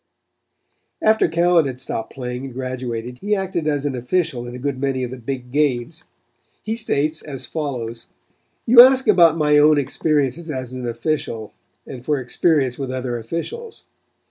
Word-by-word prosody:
After 220 -3 +4
Cowan 170 -1 +3
had 130 -1 -6
stopped 115 -3 -5
playing 125 0 -5
and 135 - -8
graduated 125 -2 -5
he 210 +1 0
acted 185 -5 -2
as 145 -2 0
an 140 -2 -1
official 125 -1 -1
in 120 - -7
a - - -6
good 135 0 -3
many 135 -1 -1
of 125 - -4
the 130 - -6
big 125 0 -6
games. 145 +2 0 0.6
He 220 - -2
states 155 -8 -1
as 135 -4 -7
follows: 120 -6 -5 0.6
"You 240 +1 +9
ask 265 +1 +6
about 165 -2 +6
my 150 -1 +4
own 150 0 +5
experiences 145 +2 0
as 130 -3 -5
an 125 -1 -5
official, 115 -2 -3 0.3
and 125 -2 -9
for 145 +1 0
experience 130 0 +1
with 135 -2 -3
other 125 -2 -3
officials. 430 - -6
135 Hz, 165 wpm, -21 LUFS, 125-160 Hz, 0.6 s, You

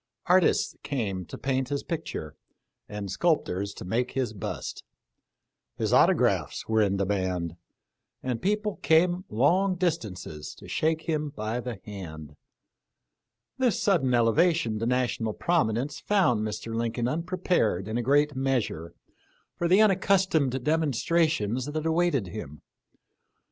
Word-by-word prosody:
Artists 180 -1 +3
came 100 -10 -3
to - - -8
paint 130 -1 -1
his 140 -1 -2
picture, 160 - -5 0.5
and 105 -2 -5
sculptors 100 - 0
to - - -8
make 120 +7 -1
his 125 -4 -1
bust. 100 - -5 0.9
His - - 0
auto - - +6
graphs - - 0
were 110 0 +3
in 100 -2 +2
demand, 95 -4 -1 0.7
and 125 -3 -2
people 210 +1 0
came 175 +3 +3
long 180 - +2
dis 175 -2 +1
tances 90 -7 -8
to - - -13
shake 160 0 0
him 155 -3 -1
by 110 -3 -3
the 120 -4 -5
hand. 80 -7 -8 1.2
This 250 -6 +2
sudden 165 -11 +2
ele 115 -2 +3
vation 160 -10 +2
to 115 - -1
national 120 -3 0
prominence 140 -3 0
found 180 - +2
Mr. 110 +1 -4
Lincoln 115 +1 -1
unprepared 165 - 0
in 110 - -3
a - - +1
great 145 +3 +2
measure 120 -11 -1 0.6
for 175 - -1
the 190 +5 +5
unaccus 195 -1 +3
tomed 135 -7 0
demonstrations 155 -5 +1
that 155 +1 -3
awaited 160 - +2
him. 90 -6 -8
130 Hz, 135 wpm, -27 LUFS, 105-165 Hz, 1.2 s, auto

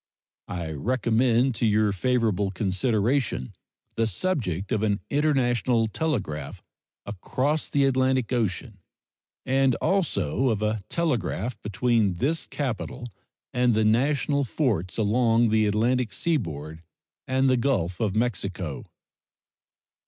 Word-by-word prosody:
I 85 -3 -4
recommend 120 - +1
to 115 - +2
your 105 0 +3
favorable 105 -2 +1
consideration 105 - 0 0.4
the 115 0 +2
subject 100 - -2
of 110 -4 +1
an 105 -2 +1
international 125 -5 +2
telegraph 110 - -3 0.4
across 130 - -1
the 140 -1 +2
Atlantic 130 -2 +1
Ocean, 110 -2 -2 0.7
and 135 -1 +2
also 170 -8 0
of 110 -2 -1
a 105 0 0
telegraph 120 - -2
between 105 -1 +1
this 150 - -1
capital 125 -2 -4 0.4
and 125 -2 +2
the 110 0 +2
national 140 +5 +2
forts 110 - -1
along 115 +1 +3
the 110 0 +3
Atlantic 115 +2 +1
seaboard 80 - -2 0.5
and 130 +1 +2
the 130 - +4
Gulf 115 -10 0
of 105 -3 0
Mexico. 95 - -2
115 Hz, 110 wpm, -25 LUFS, 100-130 Hz, 0.7 s, the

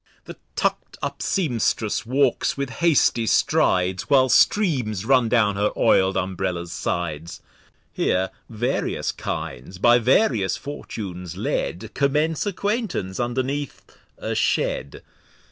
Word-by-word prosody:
The - - -10 0.2
tuck'd - - -2
up - - -4
Sempstress 120 - 0
walks 135 +3 +1
with 140 -2 -3
hasty 145 -8 +3
Strides, 90 -2 +2
While 130 -2 +5
Streams 125 - +2
run 125 -2 +3
down 105 -4 +2
her 105 +1 +2
oil'd 95 0 +3
Umbrella's 90 -2 -2
Sides. 85 -1 -3 0.5
Here 95 +1 0 0.2
various 120 +3 -1
Kinds 70 +10 -6
by 120 +5 +5
various 115 - +2
Fortunes 90 - -7
led, 105 0 -3
Commence 150 +5 +1
Acquaintance 200 - -2
underneath 130 +4 -2 0.3
a - - -3
Shed. 70 - -1
115 Hz, 110 wpm, -23 LUFS, 95-140 Hz, 0.5 s, While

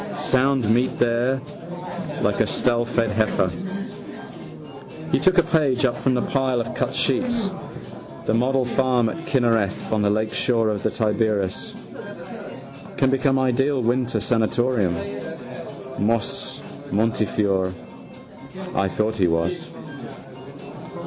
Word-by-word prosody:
Sound 130 -2 +2
meat 125 +2 +1
there: 120 +3 +2 0.8
like - - +1
a - - +3
stallfed 120 -2 +1
heifer. 105 -3 +1 1.6
He - - +3
took 185 -1 +3
a 175 - +7
page 155 -7 +2
up 120 - +1
from 130 -1 +1
the 125 - +1
pile 130 -2 +1
of 115 - -3
cut - - -1
sheets: 240 - +1 0.7
the - - +1
model 130 +3 +2
farm 125 -2 +2
at 165 +8 -6
Kinnereth 115 - +1
on 110 -1 +2
the 105 - +3
lakeshore 110 +2 +1
of 105 -2 -1
Tiberias. 105 -3 0 1.2
Can 135 - +3
become 135 0 +2
ideal 130 +2 +2
winter 120 0 +1
sanatorium. 115 -3 +1 1.0
Moses 110 +2 -1 0.3
Montefiore. 100 -3 +1 1.0
I 95 - +2
thought 110 +3 0
he 95 -5 +3
was. 85 +1 -1
120 Hz, 110 wpm, -23 LUFS, 110-130 Hz, 1.6 s, a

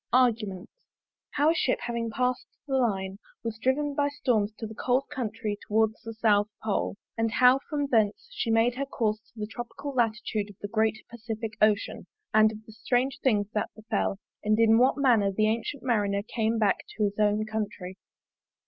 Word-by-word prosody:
ARGUMENT. 220 -7 +2 0.7
How 295 +3 +4
a - - +2
Ship 290 -6 +1
having 235 -1 -2
passed 250 +2 -1 0.2
the 275 -2 -1
Line 195 -6 0 0.2
was 225 -1 -4
driven 285 +3 +1
by 285 0 +1
Storms 240 -8 0
to 225 - -5
the 220 - -7
cold 250 +4 +1
Country 220 -6 -3
towards 220 +1 +1
the 225 0 -8
South 210 -2 +3 0.2
Pole; 205 -2 -1 0.2
and 225 0 +2
how 255 +1 +6
from 290 -2 0
thence 225 - +1
she 365 - -3
made 225 +2 +3
her 275 - -1
course 215 -5 -1
to 225 +1 -19
the 210 - -2
tropical 240 +6 -7
Latitude 225 -3 0
of 200 - -14
the 205 - -5
Great 220 0 0
Pacific 225 -1 -5
Ocean; 215 0 +2 0.3
and 215 0 +6
of 215 0 -11
the 220 - -13
strange 245 +4 0
things 210 -6 +2
that 210 - -1
befell; 215 -2 -1 0.3
and 215 +1 +2
in 225 0 +6
what 260 +3 +4
manner 235 -8 +4
the 215 +2 +1
Ancyent 230 +5 -1
Marinere 205 -5 +1
came 225 0 0
back 210 -3 +3 0.2
to 215 - +1
his 205 0 -1
own 210 0 +2
Country. 210 -4 -4
225 Hz, 185 wpm, -28 LUFS, 210-245 Hz, 0.7 s, how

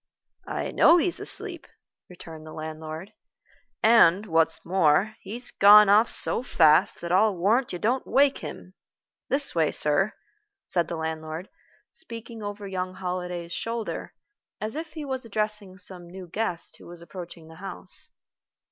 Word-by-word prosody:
"I - - -3
know 340 - +6
he's 350 +1 0
asleep," - - -6 0.4
returned 165 -3 -11
the 155 - -10
landlord; 155 +3 -7 0.7
"and, 215 -4 +5
what's 160 -3 +1
more, 185 +4 +2
he's 235 +6 -7
gone 205 +1 +7
off 215 +3 +5
so - - +5
fast 160 -11 +3
that 170 - -5
I'll 195 +1 +3
warrant 225 +8 +1
you 180 - -4
don't 245 +8 -1
wake 280 0 +3
him. 185 - -9 0.6
This 280 +1 +4
way, 160 -3 +1
sir," 150 +8 +2 0.5
said 175 -3 0
the 170 - -4
landlord, 160 +2 -5 0.4
speaking 230 - -8
over 205 0 -6
young 185 -1 -4
Holliday's 180 -2 -5
shoulder, 230 -1 -5 0.4
as 215 +4 -4
if 315 0 -6
he 310 -2 -6
was 265 -2 -4
addressing 210 -3 -1
some 180 -2 -8
new 185 +1 -10
guest 180 -2 -3
who - - -15
was 170 0 -11
approaching 170 -1 -10
the 160 0 -14
house. 195 +9 -7
190 Hz, 145 wpm, -26 LUFS, 170-220 Hz, 0.7 s, gone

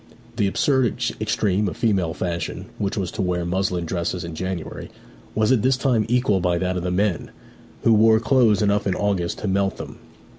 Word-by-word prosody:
The 105 -4 +2
absurd 130 +4 +1 0.3
extreme 105 -1 +1
of - - -5
female 95 -8 0
fashion, 85 -2 -3
which 100 +1 -2
was 95 -3 -2
to - - -4
wear 90 -2 -1
muslin 90 -1 -1
dresses 85 +1 -2
in 85 -1 -6
January, 95 0 -5 0.5
was 110 +1 +2
at 125 -5 +3
this 130 +2 +2
time 120 -5 +1
equalled 120 -6 +2
by 90 -1 +1
that 90 +1 -1
of 90 - -2
the 90 - -2
men, 90 0 0 0.5
who 115 - +5
wore 110 +1 +5
clothes 115 -4 +3
enough 100 0 +1
in 95 - +1
August 95 -4 -1
to 105 - -4
melt 95 0 0
them. - - -9
100 Hz, 190 wpm, -22 LUFS, 90-110 Hz, 0.5 s, who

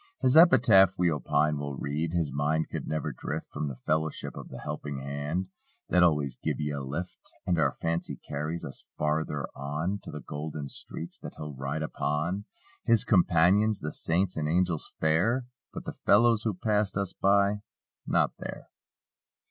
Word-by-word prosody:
His 130 +2 +3
epitaph, 120 - +7
we 90 -1 +3
opine, 75 0 +1
will 70 -1 -4
read: 75 +4 -2
"His 85 -4 0
mind 75 +3 0
could - - -4
never 80 - -2
drift - - -5
From 75 0 -3
the 70 - -5
fellowship 80 +4 -2
of - - -8
the 65 - -8
helping 75 -1 -5
hand 70 +7 -3 0.4
That 90 - +4
always 75 -7 +3
'give - - -2
ye 75 0 -1
a 70 -1 -3
lift.' 75 +7 -6
" - - -40
And 90 -2 +1
our 70 -3 +3
fancy 85 +3 -2
carries 75 +4 -4
us 70 - -9
farther 75 -1 0
on: 75 +8 -2
To - - -10
the 75 - -6
golden 75 -1 -5
streets 85 - -7
that - - -8
he'll 75 -1 -6
ride 70 +4 -3
upon— 80 +6 -2 0.4
His 115 0 +4
companions, 95 +2 +4
the 75 - -3
saints 90 +4 0
and 75 -1 0
angels 85 0 0
fair. 95 +12 +2 0.3
But - - -7
the - - -4
fellows 115 +1 +4
who 110 -4 0
passed 105 0 0
us 100 -2 -1
by! 100 +1 +3 0.5
Not - - +3
there. - - -7
80 Hz, 170 wpm, -28 LUFS, 75-95 Hz, 0.5 s, epitaph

